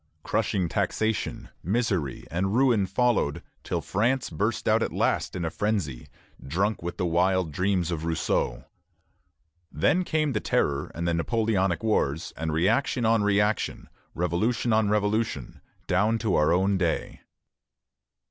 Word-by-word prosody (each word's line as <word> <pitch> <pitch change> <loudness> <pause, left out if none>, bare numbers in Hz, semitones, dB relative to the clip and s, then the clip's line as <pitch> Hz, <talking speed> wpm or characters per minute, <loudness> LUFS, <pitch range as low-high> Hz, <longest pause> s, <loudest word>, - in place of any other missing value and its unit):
Crushing 90 -3 0
taxation, 110 +6 -1
misery, 95 - -1
and 95 +4 0
ruin 120 -7 +3
followed, 100 - +1 0.2
till - - -2
France 120 +4 0
burst 80 - -1
out - - +4
at - - -1
last - - 0
in 90 -2 -2
a 80 - -2
frenzy, 100 - -2 0.4
drunk 95 +9 -1
with 85 +1 -5
the 95 - -1
wild 90 0 +1
dreams 90 +1 0
of 80 -2 -3
Rousseau. 80 -1 -1 1.1
Then 165 - +2
came 155 -4 0
the 105 - 0
Terror 70 -7 0
and 85 +2 -2
the 85 - +1
Napoleonic 100 0 0
wars, 80 -8 0
and 80 -1 -3
reaction 105 - +1
on 115 0 +3
reaction, 105 +1 0 0.3
revolution 105 +8 0
on 110 -1 +3
revolution, 105 - -1 0.2
down 105 +5 +2
to 110 -3 -1
our 75 +1 +3
own 95 +2 +2
day. 85 -4 -2
95 Hz, 140 wpm, -26 LUFS, 85-110 Hz, 1.1 s, out